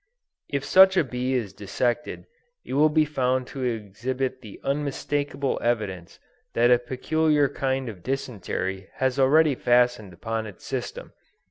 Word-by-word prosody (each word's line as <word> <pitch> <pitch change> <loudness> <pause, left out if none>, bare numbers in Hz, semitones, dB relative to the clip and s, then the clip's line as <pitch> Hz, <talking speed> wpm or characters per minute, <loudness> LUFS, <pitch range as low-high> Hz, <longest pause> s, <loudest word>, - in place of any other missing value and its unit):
If 140 0 -2
such 190 0 +7
a - - +5
bee 130 0 -2
is 110 -7 -2
dissected 120 +8 -2 0.4
it - - -6
will 150 +3 +5
be 155 0 +3
found 130 -3 0
to 135 - -4
exhibit 125 +3 -3
the 105 -5 -11
unmistakable 140 0 -1
evidence 100 -7 -2 0.4
that 120 +1 +4
a 125 - +6
peculiar 145 +4 +1
kind 135 -1 -2
of 100 -6 -8
dysentery 95 -6 -3
has 130 0 0
already 150 +3 +5
fastened 120 -5 +2
upon 110 +5 -4
its 100 - -12
system. - - -5
130 Hz, 140 wpm, -25 LUFS, 115-140 Hz, 0.4 s, such